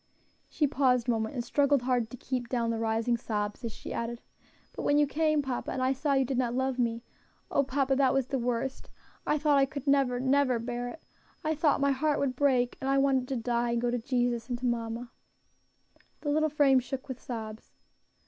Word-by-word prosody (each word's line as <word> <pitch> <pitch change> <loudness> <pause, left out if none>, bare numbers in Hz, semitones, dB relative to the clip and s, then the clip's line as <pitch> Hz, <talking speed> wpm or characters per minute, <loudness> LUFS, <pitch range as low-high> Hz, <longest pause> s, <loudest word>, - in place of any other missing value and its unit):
She 300 - +1
paused 260 -4 +2
a - - +3
moment, 220 +1 -2
and 240 -2 -3
struggled 280 0 +2
hard 245 -3 +1
to 250 - -9
keep 245 -1 -4
down 235 -2 0
the 225 - -2
rising 225 +1 +1
sobs, 210 0 -3
as 230 - -3
she - - -8
added, 235 0 -3 0.5
"But - - -6
when 290 - +2
you 295 - +5
came, 305 +1 +1
papa, 260 -2 -3
and - - -3
I 260 +1 +2
saw 280 +2 0
you 270 -1 +3
did 255 0 -1
not 245 -1 0
love 260 0 -1
me, 230 -1 0 0.5
oh! - - +3
papa, 270 0 0
that 270 -2 +4
was 270 -1 +1
the 265 +1 -2
worst. 245 +2 -2 0.4
I 300 - +2
thought 295 -1 +3
I 270 - +4
could 275 0 -7
never, 275 -3 +2
never 260 -1 +2
bear 240 +1 -4
it. 280 +6 -9 0.4
I 315 0 +1
thought 300 -2 +2
my 280 0 +3
heart 295 +2 +1
would 265 -2 0
break, 255 -3 +2
and 265 - -1
I 275 - +3
wanted 270 -2 +2
to 270 - -2
die 235 0 0
and 235 - 0
go 240 0 0
to 245 - -1
Jesus, 245 -1 -1
and 245 - -1
to 250 - -5
mamma." 235 0 -2 1.1
The 290 - -1
little 310 +1 +2
frame 280 -3 +4
shook 260 +2 -6
with 260 -2 -7
sobs. 220 -2 -7
255 Hz, 220 wpm, -29 LUFS, 240-275 Hz, 1.1 s, you